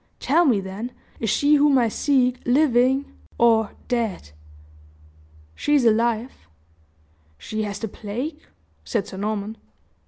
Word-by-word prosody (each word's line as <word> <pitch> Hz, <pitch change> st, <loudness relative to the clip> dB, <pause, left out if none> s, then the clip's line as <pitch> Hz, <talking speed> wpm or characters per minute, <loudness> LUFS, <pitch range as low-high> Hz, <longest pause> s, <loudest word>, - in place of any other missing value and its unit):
Tell 335 Hz, +4 st, +3 dB
me, 240 Hz, -9 st, +3 dB
then, 195 Hz, +6 st, -6 dB, 0.3 s
is 225 Hz, -, -1 dB
she 290 Hz, +7 st, +4 dB
whom 290 Hz, -1 st, +4 dB
I 240 Hz, -2 st, +3 dB
seek 255 Hz, +1 st, +1 dB
living 260 Hz, 0 st, +3 dB, 0.3 s
or 225 Hz, -3 st, +3 dB
dead?" 225 Hz, -, -2 dB, 1.2 s
"She 295 Hz, -, 0 dB
is 270 Hz, -4 st, +3 dB
alive." 230 Hz, -, 0 dB, 0.9 s
"She 215 Hz, -, -5 dB
has 200 Hz, -1 st, -4 dB
the 225 Hz, -, -4 dB
plague?" 245 Hz, +10 st, -5 dB, 0.4 s
said 215 Hz, -4 st, -2 dB
Sir 190 Hz, -, -9 dB
Norman. 210 Hz, +1 st, -3 dB
235 Hz, 125 wpm, -23 LUFS, 215-265 Hz, 1.2 s, she